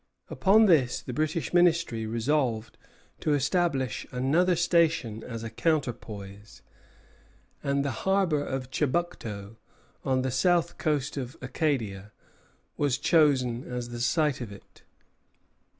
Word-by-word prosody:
Upon 215 +3 +5
this 150 -10 +3
the 125 - -7
British 155 +4 -1
Ministry 165 -10 +2
resolved 115 -1 -1 0.4
to 150 - +1
establish 135 - 0
another 155 +9 +2
station 165 -10 +1
as 115 -2 -6
a 115 - -4
counterpoise; 110 -8 -3 1.0
and 140 0 0
the 140 - 0 0.2
harbor 190 -7 +2
of 130 -2 -4
Chebucto, 115 - -2 0.5
on 130 -1 +1
the 130 - -1
south 175 +5 +1
coast 150 -2 -1
of 130 -1 -5
Acadia, 120 -8 -2 0.7
was 140 -4 +1
chosen 130 -7 +2
as 125 -1 -4
the 120 0 -6
site 145 +2 +1
of 115 -4 -6
it. 100 - -15
135 Hz, 120 wpm, -27 LUFS, 120-160 Hz, 1.0 s, Upon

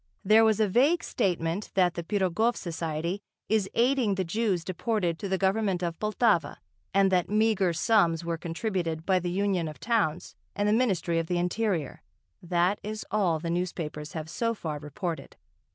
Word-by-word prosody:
There 215 +3 +6
was 220 -1 +3
a 215 - +3
vague 275 - +3
statement 180 -2 -1
that 180 -2 +3
the 170 - -4
Pirogov 205 +5 +1
Society 170 +2 -3 0.3
is 210 -3 +1
aiding 245 -4 +2
the 190 - 0
Jews 190 -1 0
deported 185 -2 -1
to 200 - -4
the 190 - +1
Government 195 -1 +1
of 170 -1 -3
Poltava 210 -7 +1 0.3
and 195 0 +3
that 180 -2 +2
meagre 210 -3 +2
sums 170 -3 +2
were 170 0 -1
contributed 170 -2 -3
by 190 -1 +3
the 175 0 -3
Union 185 -2 0
of 155 - -8
Towns 200 -8 0 0.2
and 205 0 0
the 210 - +3
Ministry 190 -8 +1
of 165 - -3
the 180 - 0
Interior, 180 - -1 0.4
that 175 +3 +1
is 215 +1 -5
all 190 -6 +2
the 165 +1 -4
newspapers 165 -4 -3
have 155 -1 -5
so 230 +7 -1
far 155 -7 -4
reported. 160 +4 -5
185 Hz, 170 wpm, -28 LUFS, 170-215 Hz, 0.4 s, There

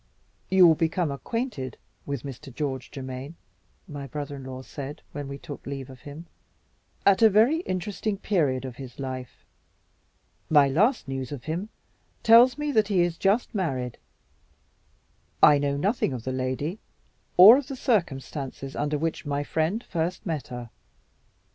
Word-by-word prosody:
"You 190 -1 +7
will 165 - +8
become 165 0 0
acquainted 140 - -4 0.3
with 140 -3 -3
Mr. 135 0 -8
George 130 -1 -4
Germaine," 130 +3 -7 0.5
my 145 -4 -7
brother 145 +1 -5
in 135 - -9
law 130 0 -7
said, 145 +2 -8
when 145 -1 -6
we 140 0 -6
took 145 -1 -9
leave 135 -1 -6
of 130 - -13
him, 145 +4 -9 0.8
"at 200 +1 +5
a 225 - +8
very 225 +10 +4
interesting 200 +2 -2
period 150 -11 0
of 125 -2 -7
his 130 -3 -9
life. 130 -2 -7 1.0
My 145 -3 +6
last 205 - +2
news 135 -1 -4
of 140 -4 -6
him 170 +7 -3 0.5
tells 235 +3 +7
me 295 0 -1
that 215 -6 +3
he 195 -4 +2
is 175 -1 +1
just 200 +8 +1
married. 130 - -2 1.4
I 145 -1 +8
know 140 0 0
nothing 195 - 0
of 120 -3 -5
the 130 - -3
lady, 130 +8 -2 0.6
or 205 +7 +11
of 280 - -7
the 270 - -5
circumstances 140 - -2
under 150 +1 -1
which 160 0 -3
my 145 0 -1
friend 165 +10 -1
first 170 +1 -3
met 160 -6 -2
with - - -18
her. 120 -2 -7
145 Hz, 160 wpm, -26 LUFS, 135-190 Hz, 1.4 s, or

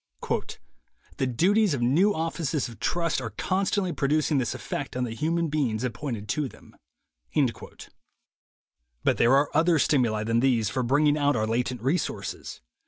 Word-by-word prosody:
"The 130 - 0
duties 185 - +2
of 120 - -2
new 165 +12 +4
offices 160 -3 -1
of 115 -2 -12
trust 170 +2 0
are 115 - -4
constantly 185 - -1
producing 150 +1 +1
this 120 - -2
effect - - -5
on 125 - 0
the 115 -2 -3
human 165 +7 0
beings 130 -7 -1
appointed 120 -4 -4
to 150 -3 -1
them." - - -18 2.3
But - - +2
there 120 +3 +5
are 140 +1 +2
other 165 +2 +3
stimuli 120 -8 +2
than 115 +1 +1
these 120 -5 +2
for 130 - -1
bring 140 +5 +2
ing 150 0 +3
out 145 -1 +2
our 110 -2 +1
latent 120 +1 -2
resources. 145 +8 -3
140 Hz, 155 wpm, -26 LUFS, 120-160 Hz, 2.3 s, there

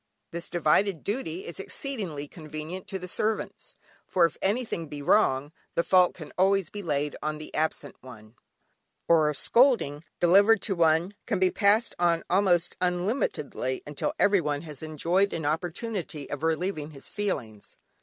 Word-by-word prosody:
This 170 +1 -5
divided 175 +2 +2
duty 200 -6 -3
is 170 - -6
exceedingly 190 - -4
convenient 155 +4 -8
to 195 - -3
the 180 -1 -7
servants, 215 +4 -3 0.3
for 175 -2 +4
if 165 - -2
anything 200 -5 -1
be 145 0 -7
wrong 145 -6 +3 0.2
the 170 - +2
fault 180 -1 +4
can 155 -4 -10
always 195 -2 +3
be 205 - -6
laid 150 -4 -1
on 155 0 -2
the 155 - -10
absent 155 -2 -2
one, 110 -4 -13 0.7
or 160 -2 +5
a 150 - -2
scolding 225 - +3 0.2
delivered 200 +5 +6
to 200 - 0
one 165 +3 +3
can - - 0
be 185 0 +3
passed 215 +3 +3
on 170 -1 +2
almost 180 -2 +2
unlimitedly 180 - -1
until 145 -1 -3
everyone 160 -8 +2
has 150 -4 -8
enjoyed 170 +6 +1
an 160 -2 -3
opportunity 165 - -3
of 145 - -4
relieving 160 -1 -1
his 140 -3 -8
feelings. 125 - -4
170 Hz, 155 wpm, -27 LUFS, 150-195 Hz, 0.7 s, delivered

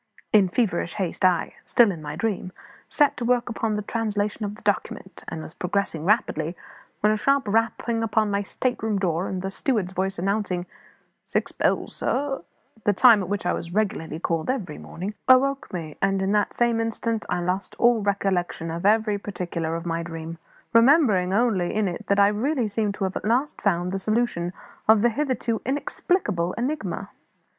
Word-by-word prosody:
In 200 -4 +6
feverish 175 -6 0
haste 190 -4 -3
I 185 -2 +3
still 235 -5 +4
in 165 -4 -7
my 150 0 -5
dream 185 0 -2 0.4
set 290 -2 +3
to - - -3
work 245 0 +1
upon 225 -2 -1
the 210 - -2
translation 210 -1 -2
of 205 0 -3
the - - -17
document, 200 -1 -2
and 160 - -5
was - - -10
progressing 180 -4 -2
swimmingly, 175 -5 +1 0.5
when 210 - +4
a - - 0
sharp 275 +2 +2
rapping 225 +2 0
upon 220 -1 +1
my 200 0 +1
state 245 +5 -2
room 220 -2 0
door, 180 -1 0
and 185 -1 -4
the 195 - -3
steward's 210 -5 -1
voice 190 +1 -2
announcing, 190 -1 -1 0.6
"Six - - -1
bells, - - 0
sir," 275 0 -1 0.4
(the 205 - +3
time 225 0 +7
at 185 - -5
which 205 -2 -2
I 180 - +2
was 170 +2 -5
regularly 195 -7 -1
called 165 +1 -2
every 205 - -2
morning), 190 +5 -6
awoke 270 +2 +4
me; 160 -4 -6
and 195 0 +2
in 190 +1 0
that 210 -1 +1
same 235 -1 +2
instant 225 0 -1
I - - 0
lost 180 +3 -2
all 240 -2 +4
recollection 190 -4 -1
of 170 +4 -1
every 215 -1 +3
particular 170 -5 -3
of 165 +1 -5
my 165 0 -1
dream, 165 0 -7 0.3
remembering 230 - +5
only 205 -4 +2
that - - -4
in 215 -2 +2
it 200 +3 -1
I 200 0 +6
really 245 +4 0
seemed 205 -1 -1
to 200 - -4
have 190 0 -2
at - - -6
last 250 +7 0
found 180 -2 +1
the 195 - -2
solution 215 -5 0 0.4
of 220 -1 +6
the 240 - +5
hitherto 245 -3 -1
inexplicable 260 - -1
enigma. 285 +6 -3
205 Hz, 185 wpm, -24 LUFS, 180-230 Hz, 0.6 s, time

